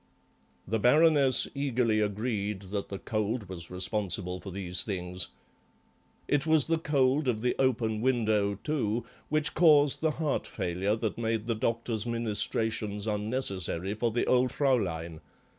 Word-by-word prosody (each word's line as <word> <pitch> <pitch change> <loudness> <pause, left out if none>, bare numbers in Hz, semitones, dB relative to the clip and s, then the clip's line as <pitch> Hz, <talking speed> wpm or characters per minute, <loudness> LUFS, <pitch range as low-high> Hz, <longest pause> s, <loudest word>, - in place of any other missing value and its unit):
The 110 +3 -1
Baroness 140 +1 +5
eagerly 125 -6 0
agreed 105 -1 -2
that 100 -1 -3
the 100 - -5
cold 110 +1 -3
was 85 -2 -6
responsible 90 -1 -1
for 100 - -8
these 90 -1 -2
things. 90 -3 -3 1.0
It 145 +1 +1
was 160 -2 +6
the 165 0 0
cold 140 -2 +1
of 110 -3 0
the 125 +1 +1
open 115 -5 0
window, 110 -5 +1
too, 115 -2 -2 0.2
which 155 0 0
caused 150 -4 +5
the 160 - +2
heart 155 -3 -1
failure 95 +4 -2
that 110 0 -3
made 110 -1 -1
the 115 - 0
doctor's 115 0 -2
ministrations 110 -2 0
unnecessary 105 -4 -1
for 115 +2 -1
the 120 +2 -1
old 125 0 +2
Fraulein. 85 - -1
110 Hz, 140 wpm, -29 LUFS, 100-130 Hz, 1.0 s, was